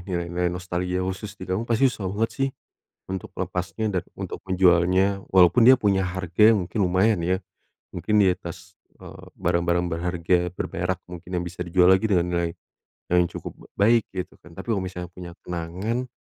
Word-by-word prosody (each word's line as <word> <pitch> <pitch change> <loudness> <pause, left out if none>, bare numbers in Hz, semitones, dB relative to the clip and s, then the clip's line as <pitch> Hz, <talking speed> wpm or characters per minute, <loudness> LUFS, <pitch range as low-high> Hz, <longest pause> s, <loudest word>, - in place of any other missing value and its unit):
nilai-nilai 85 0 -1
nostalgia 90 0 -2
khusus 95 +2 -5
di 95 - -8
kamu, 95 +5 -1
pasti 120 +4 +4
susah 95 -5 -4
banget 110 +2 0
sih 135 0 0 0.6
untuk 95 -1 -5
melepasnya 90 +4 -3
dan 85 - -5
untuk - - -6
menjualnya, 95 +2 +3
walaupun 95 +5 +6
dia 130 - +10
punya 95 -2 +2
harga 90 +4 +3
mungkin 90 +2 -4
lumayan 95 +3 +3
ya, 95 +2 +1 0.6
mungkin 105 0 +2
di 95 - +5
atas, 90 0 -9 0.2
eee, - - -11
barang-barang 85 0 +1
berharga 85 +1 +1 0.2
berberak 90 0 -3
mungkin 90 0 -10
yang - - -4
bisa 90 0 -6
dijual 90 +1 +4
lagi 95 +4 +3
dengan 85 -1 +3
nilai 85 -1 0 0.6
yang 90 - +5
cukup - - -7 0.2
baik 115 +3 +5
gitu 90 -1 -5
kan. 85 - -15
Tapi - - -8
kalau 100 -3 0
misalnya 90 -1 -6
punya 90 -1 -8 0.2
kenangan, 90 +9 -3
90 Hz, 165 wpm, -24 LUFS, 90-100 Hz, 0.6 s, dia